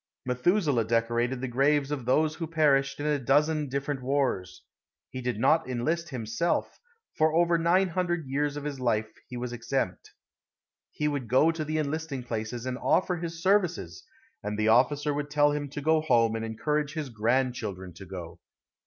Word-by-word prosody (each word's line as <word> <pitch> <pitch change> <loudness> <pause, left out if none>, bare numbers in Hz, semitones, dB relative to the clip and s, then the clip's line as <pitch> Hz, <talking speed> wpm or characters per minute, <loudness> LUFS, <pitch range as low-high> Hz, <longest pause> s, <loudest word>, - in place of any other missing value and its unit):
Methuselah 130 - +2
decorated 120 +2 0
the 130 - -2
graves 140 +3 +2
of 135 -5 -3
those 155 +4 +3
who 165 0 -5
perished 145 -4 +2
in 145 - -3
a 150 -1 +1
dozen 150 +3 +2
different 140 0 -3
wars. 125 -9 -1 0.5
He 130 - -5
did 125 -3 -2
not 155 +4 +3
enlist 160 +8 -1
himself, 125 +6 -2 0.4
for 155 0 +3
over 170 0 +3
nine 180 +3 +3
hundred 175 -2 -1
years 145 +2 -1
of 145 - -5
his 145 -2 -4
life 110 -3 0 0.2
he 125 - -7
was 120 0 -4
exempt. 120 -5 -3 0.8
He 150 - -1
would 140 -5 -2
go 130 +8 +4
to 165 -1 -4
the 155 +1 -2
enlisting 155 -3 -3
places 115 0 -4
and 130 0 -3
offer 180 -1 +1
his 165 0 -6
services, 190 -3 +1 0.4
and 105 0 -4
the 110 0 +2
officer 145 +5 +3
would 145 0 -3
tell 145 0 +3
him 145 -1 -3
to 145 +2 -6
go 160 +2 +3
home 115 -7 +3
and 115 - -3
encourage 150 +7 -1
his 155 -4 -4
grandchildren 115 -5 -1
to 95 - -11
go. 90 -3 -8
140 Hz, 175 wpm, -28 LUFS, 120-155 Hz, 0.8 s, go